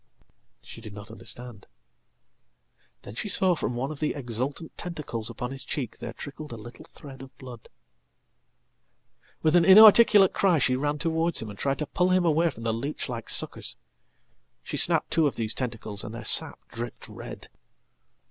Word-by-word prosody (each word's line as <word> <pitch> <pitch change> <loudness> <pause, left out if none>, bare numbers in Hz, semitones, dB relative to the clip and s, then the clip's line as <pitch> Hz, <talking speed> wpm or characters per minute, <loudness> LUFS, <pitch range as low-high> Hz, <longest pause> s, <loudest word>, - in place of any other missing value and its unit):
She - - -11
did 105 -2 -10
not 105 +2 -10
understand. 115 -1 -6 1.4
Then 100 - -10
she 205 - -4
saw 190 -1 +3
from 140 -6 -3
under - - -5
one 135 +4 -3
of 150 - -8
the 155 - -1
exultanttentacles 135 0 -5
upon 125 0 -6
his 135 0 -5
cheek 125 -7 -5
there - - -6
trickled 150 0 -9
a 115 - -7
little 120 +8 -12
thread 140 -5 -13
of 135 -1 -13
blood. 125 -4 -12 1.7
With 155 +2 +3
an 175 - +6
inarticulate 205 +1 +8
cry 185 -4 +2
she 130 -2 +2
ran 145 +3 -1
towards 165 +2 0
him, 110 -2 -6
and 100 - -13
tried 135 -1 -1
to 150 - -3
pull 180 +4 0
him 185 0 +3
awayfrom 160 -6 +1
the 115 -1 0
leech 140 +5 -4
like 115 -2 -6
suckers. - - -1 0.9
She - - -6
snapped - - +3
two 160 -1 +3
of 140 - -3
these 110 -1 -2
tentacles, 115 -5 -4
and 110 - -7
theirsap 115 -1 +3
dripped 120 0 -7
red. - - -10
135 Hz, 165 wpm, -26 LUFS, 115-160 Hz, 1.7 s, inarticulate